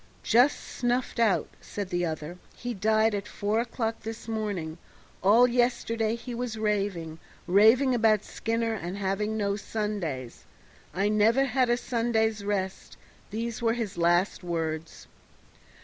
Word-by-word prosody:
"Just 245 Hz, +5 st, +4 dB
snuffed 245 Hz, 0 st, -2 dB
out," 225 Hz, -4 st, +3 dB
said 205 Hz, -3 st, -5 dB
the 175 Hz, -1 st, 0 dB
other; 160 Hz, +2 st, -5 dB, 0.2 s
"he 245 Hz, 0 st, -4 dB
died 220 Hz, +2 st, +2 dB
at 200 Hz, 0 st, -3 dB
four 210 Hz, +2 st, -1 dB
o'clock 230 Hz, -1 st, -2 dB
this 225 Hz, 0 st, -7 dB
morning; 200 Hz, -8 st, -3 dB, 0.4 s
all 220 Hz, +6 st, +6 dB
yesterday 235 Hz, -2 st, +1 dB
he 240 Hz, +1 st, -7 dB
was 235 Hz, -2 st, -3 dB
raving 195 Hz, -7 st, -1 dB, 0.3 s
raving 225 Hz, +8 st, +5 dB
about 220 Hz, -3 st, +3 dB
Skinner, 230 Hz, 0 st, -2 dB
and 185 Hz, -2 st, -5 dB
having 205 Hz, +2 st, -1 dB
no 200 Hz, -1 st, 0 dB
Sundays. 200 Hz, -, -4 dB, 0.5 s
'I 200 Hz, +3 st, +2 dB
never 225 Hz, +5 st, +4 dB
had 255 Hz, -1 st, +1 dB
a 240 Hz, -, +3 dB
Sunday's 225 Hz, -3 st, 0 dB
rest,' 195 Hz, -2 st, -3 dB, 0.3 s
these 230 Hz, +2 st, -4 dB
were 230 Hz, -1 st, +2 dB
his 225 Hz, -4 st, -3 dB
last 175 Hz, +3 st, +2 dB
words." 165 Hz, -2 st, -4 dB
215 Hz, 135 wpm, -27 LUFS, 190-230 Hz, 0.5 s, all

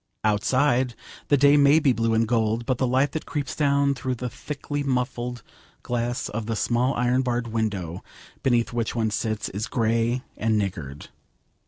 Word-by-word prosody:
Outside, 125 Hz, +4 st, +2 dB, 0.3 s
the 145 Hz, -, +4 dB
day 140 Hz, +2 st, +6 dB
may 140 Hz, +1 st, +6 dB
be 145 Hz, -5 st, +3 dB
blue 115 Hz, -1 st, +1 dB
and 115 Hz, 0 st, +2 dB
gold, 115 Hz, 0 st, +1 dB
but 130 Hz, -1 st, -1 dB
the 130 Hz, -, +2 dB
light 130 Hz, +3 st, +2 dB
that 160 Hz, -, -5 dB
creeps 145 Hz, -4 st, -3 dB
down 140 Hz, -1 st, +2 dB
through 130 Hz, -1 st, -3 dB
the 125 Hz, 0 st, -5 dB
thickly 145 Hz, +3 st, -5 dB
muffled 125 Hz, -3 st, -2 dB, 0.4 s
glass 120 Hz, 0 st, -2 dB
of 110 Hz, 0 st, -4 dB
the 115 Hz, -, -1 dB
small 120 Hz, +4 st, +1 dB
iron 125 Hz, +1 st, +2 dB
barred 120 Hz, -2 st, -1 dB
window 100 Hz, -7 st, -2 dB, 0.4 s
beneath 120 Hz, -2 st, +1 dB
which 120 Hz, 0 st, -2 dB
one 110 Hz, -2 st, 0 dB
sits 110 Hz, 0 st, -2 dB
is 105 Hz, +3 st, -4 dB
grey 115 Hz, +2 st, 0 dB
and 110 Hz, 0 st, +1 dB
niggard. 80 Hz, -9 st, -4 dB
120 Hz, 170 wpm, -25 LUFS, 110-130 Hz, 0.4 s, day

